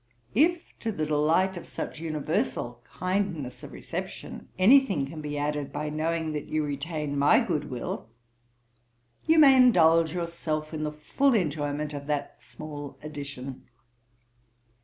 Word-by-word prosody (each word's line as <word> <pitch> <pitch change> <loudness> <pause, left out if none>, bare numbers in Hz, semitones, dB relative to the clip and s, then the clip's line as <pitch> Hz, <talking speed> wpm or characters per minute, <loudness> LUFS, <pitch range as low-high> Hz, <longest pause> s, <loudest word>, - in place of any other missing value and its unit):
If 330 - +3 0.2
to 225 - -2
the 155 -7 -2
delight 160 +5 +2
of 175 - -8
such - - -5
universal 155 -6 -2
kindness 185 -8 -2
of - - -9
reception, - - -7
any 220 +10 +8
thing 195 - -2
can 155 +3 -8
be 150 -1 -4
added 145 -1 -2
by 150 +1 -3
knowing 160 +1 -1
that 150 - -4
you 155 0 0
retain 145 0 -3
my 140 - +6
good 165 - -1
will, 120 -3 -5 1.2
you 320 0 +5
may 280 -4 +8
indulge 165 -10 +5
yourself 165 -3 -3
in 155 - -3
the 150 - -2
full 245 - +1
enjoyment 150 -4 -1
of 140 0 -6
that 145 -1 -3
small 145 -2 -8
addition. 140 -3 -7
155 Hz, 140 wpm, -27 LUFS, 145-180 Hz, 1.2 s, any